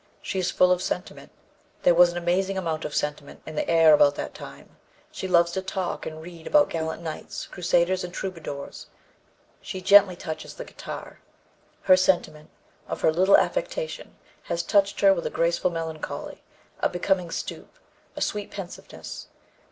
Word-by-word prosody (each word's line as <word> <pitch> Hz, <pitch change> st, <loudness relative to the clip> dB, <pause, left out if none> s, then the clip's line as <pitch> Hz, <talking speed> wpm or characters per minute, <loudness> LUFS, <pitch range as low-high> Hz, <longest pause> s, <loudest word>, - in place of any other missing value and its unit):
She 190 Hz, -, -3 dB
is 180 Hz, -1 st, 0 dB
full 180 Hz, 0 st, +4 dB
of 180 Hz, 0 st, +2 dB
sentiment; 180 Hz, 0 st, -5 dB, 0.5 s
there 175 Hz, -, +6 dB
was 175 Hz, +1 st, +7 dB
an 175 Hz, -, -6 dB
amazing 185 Hz, +3 st, 0 dB
amount 165 Hz, -4 st, -2 dB
of 150 Hz, -, -5 dB
sentiment 150 Hz, -1 st, -3 dB
in 155 Hz, -, -7 dB
the 150 Hz, -, -2 dB
air 165 Hz, -2 st, +6 dB
about 145 Hz, -1 st, +5 dB
that -, -, -5 dB
time; 70 Hz, +1 st, -12 dB, 0.3 s
she 190 Hz, -, -5 dB
loves 170 Hz, -1 st, +4 dB
to 190 Hz, -, -2 dB
talk 190 Hz, -1 st, -3 dB
and 160 Hz, 0 st, -7 dB
read 170 Hz, -1 st, -10 dB
about 295 Hz, -1 st, +4 dB
gallant 160 Hz, 0 st, -3 dB
knights, 160 Hz, -2 st, -6 dB
crusaders 180 Hz, +1 st, +1 dB
and 180 Hz, -, -6 dB
troubadors; 165 Hz, -7 st, -6 dB, 0.7 s
she 190 Hz, -, -6 dB
gently 195 Hz, 0 st, +6 dB
touches 155 Hz, -2 st, -7 dB
the -, -, -7 dB
guitar; -, -, -9 dB, 0.6 s
her 185 Hz, -, +7 dB
sentiment, 175 Hz, -5 st, 0 dB, 0.4 s
or -, -, -1 dB
her 160 Hz, -, +2 dB
little 190 Hz, +4 st, +6 dB
affectation, -, -, -2 dB, 0.3 s
has 170 Hz, -, -3 dB
touched 200 Hz, -1 st, +2 dB
her 195 Hz, -1 st, +7 dB
with 170 Hz, -, -3 dB
a -, -, -2 dB
graceful 170 Hz, +2 st, +1 dB
melancholy, 165 Hz, -2 st, -5 dB, 0.4 s
a -, -, +2 dB
becoming 180 Hz, 0 st, 0 dB
stoop, 330 Hz, -, -6 dB, 0.4 s
a -, -, -6 dB
sweet 205 Hz, -1 st, -2 dB
pensiveness. 195 Hz, -3 st, -9 dB
175 Hz, 165 wpm, -25 LUFS, 160-190 Hz, 0.7 s, was